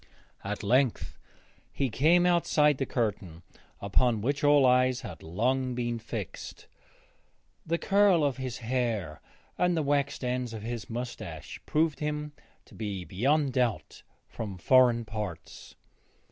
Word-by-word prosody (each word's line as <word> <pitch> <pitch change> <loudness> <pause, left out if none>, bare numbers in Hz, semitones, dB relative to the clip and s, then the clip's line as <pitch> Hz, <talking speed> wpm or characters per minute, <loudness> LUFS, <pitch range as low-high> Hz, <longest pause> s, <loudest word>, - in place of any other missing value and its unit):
At 105 +2 -4
length 125 +3 +1 0.5
he 135 -4 -1
came 165 +9 +4
outside 150 -5 +3
the 135 - -1
curtain 100 -8 -3 0.4
upon 110 +3 +1
which 140 +6 -1
all 145 -2 +5
eyes 125 0 +3
had 100 - -9
long 125 +9 -1
been 120 -1 -2
fixed. 110 -5 -7 1.0
The 170 +1 +1
curl 195 -4 +3
of 140 -3 0
his 130 -2 -4
hair 115 - -2 0.4
and 180 -1 +2
the 160 - +1
waxed 140 -1 0
ends 125 -2 -2
of 105 - -7
his 115 -1 -5
moustache 120 +1 -6
proved 155 -2 +1
him 150 0 -3 0.3
to - - -19
be 100 -5 -5
beyond 135 - +1
doubt 125 -4 -1 0.3
from 100 -4 -6
foreign 120 +4 +4
parts. 105 -7 -7
125 Hz, 130 wpm, -28 LUFS, 110-145 Hz, 1.0 s, all